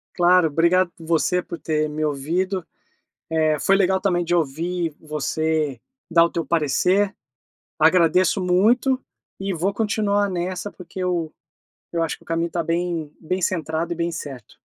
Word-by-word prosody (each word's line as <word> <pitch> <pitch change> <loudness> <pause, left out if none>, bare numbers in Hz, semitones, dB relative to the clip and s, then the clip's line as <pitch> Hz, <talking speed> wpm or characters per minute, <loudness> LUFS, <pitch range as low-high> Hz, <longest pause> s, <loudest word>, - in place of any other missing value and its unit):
Claro, 175 -1 +5
obrigado 170 +4 +2
você 170 +2 +1
por 170 -1 -7
ter 155 -1 0
me 155 +1 -3
ouvido. 165 +6 -1 0.7
Eh, 155 -2 +2
foi 195 - +3
legal 190 -1 +2
também 175 -3 +1
de 175 +1 0
ouvir 165 +1 -1
você 155 -2 -1 0.3
dar 165 0 +6
o 170 - 0
teu 170 - -2
parecer. 180 +6 +2 0.6
Agradeço 175 +4 +4
muito, 230 +9 +3 0.4
e 195 0 -2
vou 190 +4 -1
continuar 205 -2 +1
nessa 180 +3 -3
porque 180 +1 -10
eu 175 -4 -1 0.6
eu 170 - 0
acho 165 -2 -1
que - - -22
o - - -28
caminho 165 +1 -1
tá 170 0 -2
bem 165 -2 -2
bem 185 +4 -2
centrado 165 -1 -1
e - - -9
bem 170 0 -1
certo. 135 - -8
170 Hz, 155 wpm, -22 LUFS, 160-185 Hz, 0.7 s, dar